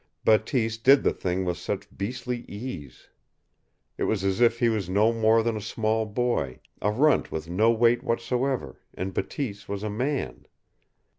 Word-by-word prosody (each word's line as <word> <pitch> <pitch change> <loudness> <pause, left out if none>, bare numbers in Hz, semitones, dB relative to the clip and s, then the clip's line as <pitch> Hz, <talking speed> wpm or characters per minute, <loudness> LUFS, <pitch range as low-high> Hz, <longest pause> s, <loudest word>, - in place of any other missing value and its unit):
Bateese 110 0 +2
did 135 +4 +6
the - - +2
thing 95 +1 -2
with 90 -1 -1
such - - -5
beastly 125 +4 -3
ease. 100 - -8 0.9
It - - +1
was 105 -3 0
as 95 +3 0
if 115 -1 +4
he 120 - +2
was 105 -6 -1
no 105 +4 +3
more 115 0 +3
than 115 -1 0
a 105 - -4
small 110 +1 -1
boy, 110 - -1 0.2
a 105 - +2
runt 135 +7 +2
with 80 0 -4
no 100 +7 +3
weight 115 +1 +3
whatever, 125 +2 -1 0.2
and 95 +1 -4
Bateese 105 -4 -4
was 100 0 -4
a 105 - -2
man. 130 +6 -3
110 Hz, 165 wpm, -26 LUFS, 100-120 Hz, 0.9 s, did